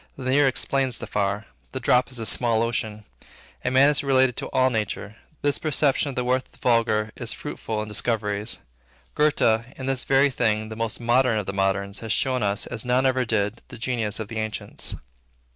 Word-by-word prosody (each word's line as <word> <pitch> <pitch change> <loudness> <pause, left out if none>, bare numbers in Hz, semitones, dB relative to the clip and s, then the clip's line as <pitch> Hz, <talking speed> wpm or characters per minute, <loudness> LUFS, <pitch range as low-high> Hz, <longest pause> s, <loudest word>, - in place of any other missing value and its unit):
The 130 -1 -2
near 145 +1 +5
explains 130 -1 +1
the - - -6
far. 100 +1 -1 0.3
The - - -2
drop 125 0 +3
is 125 - -3
a 115 - -3
small 115 +2 +2
ocean. 110 -2 -3 0.6
A - - +1
man 135 +3 +5
is 145 - -1
related 130 -3 +3
to - - -3
all 130 0 +3
nature. 105 -1 -3 0.3
This 145 -1 +1
perception 145 -2 +2
of 135 - -6
the 125 - 0
worth 130 +1 0
of - - -32
the - - -20
vulgar 110 -3 +2
is - - -3
fruitful 110 -1 -4
in - - -8
discoveries. 105 -1 -1 0.6
Goethe, 115 -7 +3 0.2
in 130 - -4
this 135 -1 0
very 135 +1 +4
thing 110 -3 0
the 110 - -6
most 115 -1 -2
modern 120 0 +3
of 105 - -2
the 95 - -4
moderns, 100 +1 -1
has 110 -2 -5
shown 130 +1 +1
us, 100 0 -1
as 115 -3 -5
none 125 +2 +2
ever 130 -1 +2
did, 110 0 -1
the - - -10
genius 115 -3 -2
of 110 - -4
the 115 0 -4
ancients. 110 -1 -3
115 Hz, 205 wpm, -24 LUFS, 105-130 Hz, 0.6 s, near